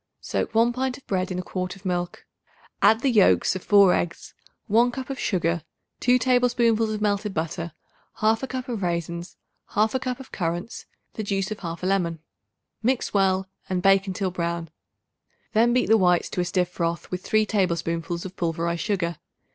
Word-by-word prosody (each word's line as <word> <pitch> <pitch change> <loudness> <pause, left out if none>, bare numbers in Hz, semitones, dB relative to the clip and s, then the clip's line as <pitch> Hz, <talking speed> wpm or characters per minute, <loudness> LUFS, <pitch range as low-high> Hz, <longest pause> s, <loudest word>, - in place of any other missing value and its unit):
Soak - - -3
1 235 +2 +4
pint 255 0 -2
of 275 - -19
bread 185 -2 -1
in 180 - -2
a 180 - -3
quart 185 0 -4
of 195 0 -18
milk; 175 -1 -2 0.6
add 225 +1 +5
the 270 - +2
yolks 210 -3 +4
of 185 - -5
4 200 -3 +6
eggs, 170 0 -3 0.3
1 235 +4 +4
cup 265 +1 -5
of 270 - -5
sugar, 170 -3 0 0.4
2 250 +1 +4
tablespoonfuls 240 -3 +2
of 210 - -5
melted 205 -1 0
butter, 165 +1 -3 0.5
1/2 225 +4 +1
cup 255 -1 -4
of 235 -5 -3
raisins, 170 0 -3 0.4
1/2 220 +5 +2
cup 255 -1 -3
of 265 - -11
currants, 175 +4 -4 0.3
the - - -4
juice 195 -1 -1
of 215 - -4
1/2 170 -1 -6
lemon. 180 -3 +1 0.6
Mix 250 +2 0
well 190 -1 +2 0.2
and 180 -1 -1
bake 195 0 +4
until 190 0 -2
brown; 170 -2 -3 0.8
then 230 +2 +4
beat 250 +1 +3
the 225 - +6
whites 180 -3 +3
to 180 - -1
a - - -1
stiff 180 0 0
froth 170 -1 -3
with 180 0 -3
3 215 0 +2
tablespoonfuls 170 -3 -1
of 190 0 -7
pulverized 170 -1 -1
sugar. 170 -5 -1
190 Hz, 180 wpm, -25 LUFS, 175-225 Hz, 0.8 s, 4